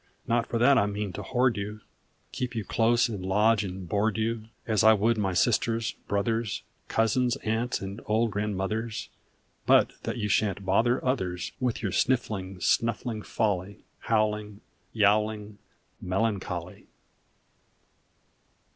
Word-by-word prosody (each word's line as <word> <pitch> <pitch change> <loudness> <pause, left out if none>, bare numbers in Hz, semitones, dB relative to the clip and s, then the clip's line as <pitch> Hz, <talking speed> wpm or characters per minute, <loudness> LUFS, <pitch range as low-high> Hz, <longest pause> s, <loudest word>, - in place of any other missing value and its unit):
Not 115 0 +1
for 115 - -1
that 130 +3 +5
I 100 - +2
mean 105 -1 -3
to 105 - -5
hoard 125 +2 +1
you, 105 +1 -5 0.5
Keep 125 -1 -4
you 110 -3 -3
close 120 +4 +3
and 105 -5 -5
lodge 105 +3 +3
and 95 -2 -6
board 105 +5 +1
you, 110 0 -1 0.2
As 110 -3 +2
I 110 0 +8
would 110 +3 +2
my 95 -4 -1
sisters, 115 +1 +2 0.2
brothers, 110 +2 -1 0.2
Cousins, 120 +3 +2
aunts, 115 +3 -1
and 100 +2 -6
old 110 +1 +2
grandmothers, 105 +2 -2 0.6
But - - +5
that - - -4
you 105 -3 -1
shan 105 -1 +2
t 100 - -12
bother 115 +7 +2
others 95 -9 -1
With 125 -3 -1
your 100 - -1
sniffling, 100 -5 0
snuffling 115 +2 0
folly, 100 -3 -2
Howling, 105 -2 -1 0.3
Yowling, 105 -1 +1 0.4
Melancholy 90 -3 -2
110 Hz, 135 wpm, -27 LUFS, 100-115 Hz, 0.6 s, I